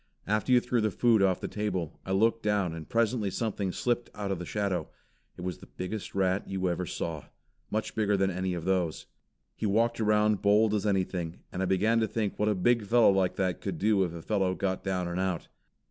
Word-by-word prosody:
After 105 +4 0
you 125 - +7
threw 120 -1 0
the 110 - +2
food 115 +1 +3
off 95 -2 +2
the - - -3
table, 95 -6 -3
I - - -2
looked 115 +4 +2
down 100 -5 +1
and 80 -2 -8
presently 115 -2 +1
something 100 -2 -2
slipped 120 +4 -1
out 100 -2 -3
of 95 - -2
the 90 - -6
shadow. 100 -3 -1 0.5
It - - -8
was 90 0 -4
the 95 - -13
biggest 100 +3 -6
rat 95 0 +1
you 95 -1 -1
ever 90 0 -2
saw. 80 -2 -4 0.4
Much 110 +1 -2
bigger 105 -2 +1
than 95 0 +2
any 90 0 -2
of 85 -1 -5
those. 90 -4 0 0.5
He 110 - -2
walked 115 +3 +2
around 105 -1 +3
bold 105 +1 +4
as 105 0 0
anything, 90 -4 -1
and 90 - -4
I - - +1
began 105 +5 +2
to 110 - +1
think 110 -1 -2
what 105 +1 +2
a 105 - +2
big 115 +5 +2
fellow 115 -1 +6
like 95 -2 +1
that 95 -2 -1
could 95 -4 -3
do 105 +1 +3
if 90 - -2
a 85 - -8
fellow 95 -3 0
got 95 -1 -2
down 90 -2 -1
and 85 +1 -3
out. 95 -3 -2
100 Hz, 225 wpm, -29 LUFS, 90-110 Hz, 0.5 s, you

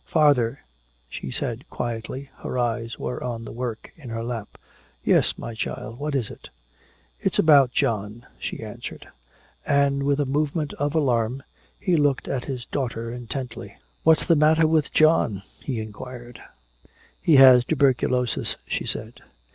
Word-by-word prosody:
"Father," 145 -7 +3 0.5
she - - -6
said - - -4
quietly. 120 +4 -4
Her - - -5
eyes 115 -1 -1
were 125 - -4
on 115 -2 -4
the - - -7
work 120 -1 -5
in 140 -7 -11
her 115 0 -3
lap. 115 -3 -5 0.5
"Yes, - - +3
my 115 - -6
child, 110 +1 -5
what 150 0 -2
is 125 -6 -1
it?" - - -12 0.7
"It's - - 0
about 140 -5 +6
John," 110 0 -1
she - - -5
answered. - - -8 0.6
And 140 -1 +2
with 140 +1 +1
a 145 - +2
movement 150 +2 -1
of 145 +2 0
alarm 125 -3 +1 0.4
he 180 -3 +1
looked 145 -3 +1
at 125 -2 -2
his 125 -3 -5
daughter 115 -4 -3
intently. 125 +1 -6 0.3
"What's 160 0 +4
the 165 - +4
matter 155 +2 +4
with 155 -1 +2
John?" 155 - +3 0.2
he 125 -5 -3
inquired. 120 +2 -8 0.8
"He 160 - +4
has 130 -2 +9
tuberculosis," 130 -3 +1
she - - -3
said. - - -5
125 Hz, 145 wpm, -24 LUFS, 115-145 Hz, 0.8 s, has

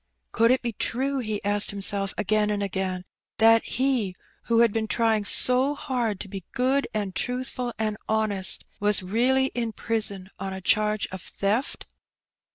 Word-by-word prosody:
Could 230 0 +2
it 255 +1 +2
be 235 -1 -3
true, 270 +6 -2
he 215 -4 -4
asked 205 0 +1
himself 200 -1 +3
again 215 0 +1
and 205 -1 -2
again, 185 -2 -3 0.3
that 225 0 +5
he, 250 -8 -1 0.3
who 230 0 +2
had 230 -3 +3
been 220 -1 -2
trying 220 -2 0
so 255 +6 +5
hard 240 -8 -3
to - - -7
be 195 -1 -8
good 265 +3 +1
and 205 -3 -3
truthful 250 +1 -3
and 215 -1 -2
honest, 215 -3 +1
was 205 -2 +3
really 255 +7 +1
in 230 -2 -3
prison 205 -5 +1
on 195 0 -5
a 190 - -6
charge 215 +2 +1
of 190 -1 -7
theft? 210 +10 -3
215 Hz, 165 wpm, -25 LUFS, 200-240 Hz, 0.3 s, that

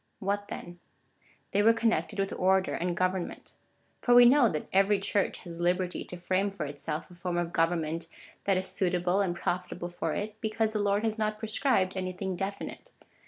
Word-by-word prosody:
What 205 +1 -2
then? 175 0 -8 0.7
They 200 - +3
were 225 +2 +5
connected 215 -9 0
with 195 0 -1
order 190 +1 +2
and 175 0 -2
government. 185 -1 -2 0.5
For 245 - +4
we 245 0 +10
know 250 -1 +6
that 150 - -3
every 195 +1 +4
Church 200 0 0
has 170 -2 -8
liberty 180 +1 0
to 180 - -7
frame 185 +3 0
for 195 -6 -5
itself 145 +4 -5
a - - -12
form 175 0 -3
of 175 -1 -2
government 165 -1 0 0.4
that 195 -2 +3
is 185 - -1
suitable 180 0 +1
and 180 -3 0
profitable 175 0 -3
for 175 - -3
it, 215 +1 -5
because 220 0 0
the 215 - 0
Lord 205 +1 +1
has 220 0 -1
not 215 0 0
pre 220 0 -6
scribed 210 -6 +2
anything 185 0 -3
definite. 200 - -5
190 Hz, 185 wpm, -29 LUFS, 175-205 Hz, 0.7 s, we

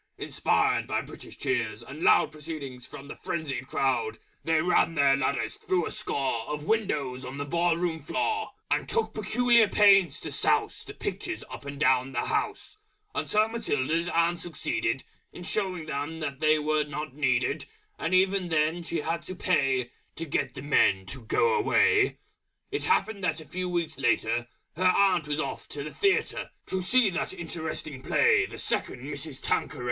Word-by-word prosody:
Inspired - - +1
by - - 0
British - - -11
Cheers 120 -3 -1
and 145 +6 -9
Loud 150 - +5
Proceeding 150 -4 -7
from 140 +3 -11
the - - -7
Frenzied 140 -6 -4
Crowd, 140 - 0 0.3
They 160 -1 +2
ran 165 0 +2
their 140 -2 +5
ladders 140 +1 -1
through 180 -3 0
a - - -4
score 130 -5 -2
Of 150 0 -4
windows 145 - 0
on 130 +2 -7
the 145 - -3
Ball 170 +2 +1
Room 170 -2 -1
Floor; 435 - -1 0.2
And - - +1
took 460 - 0
Peculiar 240 -2 +4
Pains 195 -7 +5
to - - -5
Souse - - +1
The - - -10
Pictures - - -4
up - - -8
and 140 0 -6
down 130 -2 +3
the 120 - -1
House, - - -2 0.3
Until 215 +1 +2
Matilda's 170 - -1
Aunt 170 +1 +2
succeeded 135 -7 -2 0.3
In 180 - -9
showing 185 -3 -2
them 145 -1 -4
they 155 0 +4
were 155 0 +1
not 150 -1 -6
needed 135 +1 0 0.3
And 170 +3 0
even 190 -1 +2
then 160 +2 +1
she 170 -1 -3
had 165 +2 -2
to 185 - -5
pay 135 -9 +1 0.2
To 165 - -4
get 150 - -1
the 130 - -7
Men 95 -9 +3
to 130 +7 -3
go 465 - +2
away! 415 -1 +3 0.5
It - - -2
happened 215 -3 +1
that 165 -3 0
a 160 - -10
few 185 +2 -4
Weeks 170 -4 -2
later 120 -2 +1 0.3
Her 180 - -2
Aunt 185 -3 +4
was 150 0 -1
off 140 -3 -4
to 145 - -5
the 150 - -6
Theatre 400 0 +1 0.2
To 190 - -2
see 215 +3 +4
that 170 - -2
Interesting 160 -5 -5
Play 420 - +3
_The - - -9
Second - - -2
Mrs. 140 -1 -5
Tanqueray. - - -1
155 Hz, 170 wpm, -28 LUFS, 140-180 Hz, 0.5 s, Loud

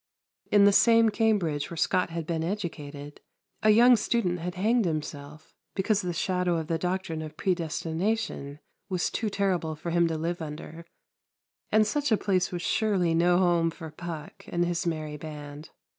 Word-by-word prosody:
In 205 -1 +6
the 200 - +7
same 230 +2 +5
Cambridge 200 -10 0
where 170 - -7
Scot 180 +3 +1
had 165 -1 -4
been 160 0 -2
educated, 150 -6 -5 0.4
a 215 - +4
young 240 +4 +7
student 210 -5 0
had 175 +2 -4
hanged 220 +4 +2
himself 155 -2 -5 0.2
because 205 +1 +1
the 180 -2 -2
shadow 180 0 0
of 160 - -3
the 165 0 -1
doctrine 180 -2 -2
of 155 -1 -8
predestination 170 -2 -2 0.3
was 180 -2 -1
too 220 - -1
terrible 185 -6 -1
for 170 +3 -5
him 170 0 +3
to 160 -1 -2
live 170 +2 -3
under; 160 +2 -8 0.9
and 215 0 +5
such 285 +4 -1
a 220 - +5
place 185 -3 0
was 175 -1 -4
surely 200 -6 +1
no 175 +2 +4
home 175 -2 +3
for 160 -1 -9
Puck 160 -1 -8
and 175 0 0
his 175 0 -1
merry 155 -2 -3
band. 150 0 -9
175 Hz, 170 wpm, -27 LUFS, 160-200 Hz, 0.9 s, the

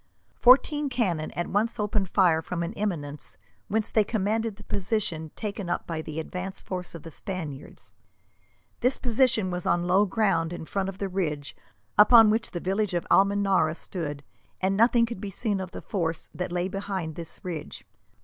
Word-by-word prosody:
Fourteen 285 +3 +5
cannon 185 -12 -1
at 175 - -2
once 220 +4 0
opened 210 -2 0
fire 175 -5 +4
from 170 0 -3
an 170 +5 -4
eminence, 155 -10 -4 0.3
whence 215 +1 0
they 215 - +4
commanded 220 +1 -1
the 205 - -14
position 185 -6 -1
taken 200 -4 -4
up - - -1
by 165 -2 -3
the 155 0 -5
advance 180 +4 -5
force 180 -2 -5
of 165 - -9
the 165 - -9
Spaniards. 155 -5 -7 0.9
This 250 +2 +2
position 235 -5 +2
was 180 0 -3
on 175 0 +2
low 190 +4 +4
ground 180 -6 +1
in 170 - -6
front 195 +3 -2
of 190 - -8
the 195 - -2
ridge 155 -7 -3 0.4
upon 225 0 +8
which 225 +1 +1
the 175 - -4
village 195 +1 -1
of 175 - -1
Almenara 195 -5 +3
stood, 150 -6 -5 0.4
and 190 +1 +1
nothing 230 +2 +4
could 230 -4 -7
be 205 - -4
seen 205 0 0
of 185 -2 -5
the - - -9
force 165 -5 -2
that 180 -1 -4
lay 175 +1 0
behind 190 -4 -4
this 165 +1 -6
ridge. 165 -5 -6
190 Hz, 180 wpm, -27 LUFS, 170-210 Hz, 0.9 s, upon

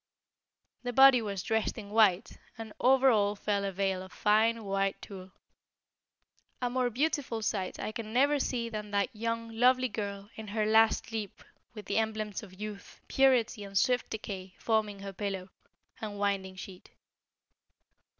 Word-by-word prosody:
The 245 -1 -4
body 265 -1 +7
was 200 -4 -4
dressed 220 +1 -1
in 205 -2 -8
white, 210 -2 +3 0.2
and 225 -2 -8
over 265 +1 +5
all 205 -2 +2
fell 200 0 -1
a 195 - -2
veil 190 0 -1
of 190 0 -10
fine 220 +2 +2
white 195 -1 -1
tulle. 190 -2 -10 1.3
A 245 -1 -1
more 250 -1 +1
beautiful 255 -3 -1
sight 195 -3 -2
I - - -3
can 215 -1 -6
never 280 +4 +3
see 240 -3 -1
than 210 -2 -6
that 200 +4 -1
young, 230 +1 -3
lovely 255 +2 +3
girl 200 -1 -5
in 220 -1 -9
her 215 +1 -1
last 220 +1 +4
sleep 220 -4 -6 0.3
with 210 - -8
the - - -1
emblems 215 -2 -2
of 185 -3 -14
youth, 210 -1 -8
purity 250 -5 +2
and 195 -1 -4
swift 250 +4 +2
decay 190 -4 -6
forming 215 -3 -1
her 195 0 -7
pillow, 195 -1 -4 0.5
and 210 -2 -5
winding 195 -2 -1
sheet. 185 -1 -10
215 Hz, 160 wpm, -30 LUFS, 200-230 Hz, 1.3 s, body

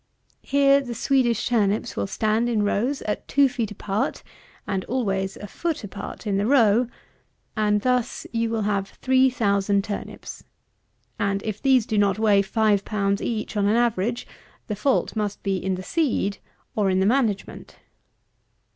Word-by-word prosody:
Here 280 0 +4
the 245 -3 -6
Swedish 240 -2 +1
turnips 215 -4 +1
will 100 - -2
stand 220 - 0
in 220 -3 +1
rows 240 +7 0
at 210 - -3
two 280 0 +4
feet 245 -4 -3
apart, 205 0 -3 0.4
(and 190 -2 -2
always 195 -6 -1
a - - -8
foot 325 - -3
apart 205 +3 -8
in 200 -2 0
the 205 +2 0
row,) 235 -3 +4 0.7
and 210 -1 +2
thus 250 +1 0
you 230 0 0
will 225 -1 -1
have 200 -1 -1
three 260 0 +4
thousand 200 -4 +1
turnips; 205 0 -7 0.8
and 200 -2 0
if 215 -1 -4
these 260 -4 +4
do 215 -2 0
not 200 -1 +2
weigh 210 -2 +4
five 205 0 +1
pounds 200 -1 -1
each 220 -2 -3
on 200 -1 +2
an 210 - +3
average, 235 -1 0 0.4
the 210 - -3
fault 255 +4 0
must 210 -2 -3
be 195 -1 0
in 190 0 -2
the 185 - -7
seed 225 - 0 0.4
or 205 -3 +2
in 185 0 +2
the 190 - +2
management. 220 -3 -1
215 Hz, 165 wpm, -24 LUFS, 200-240 Hz, 0.8 s, Here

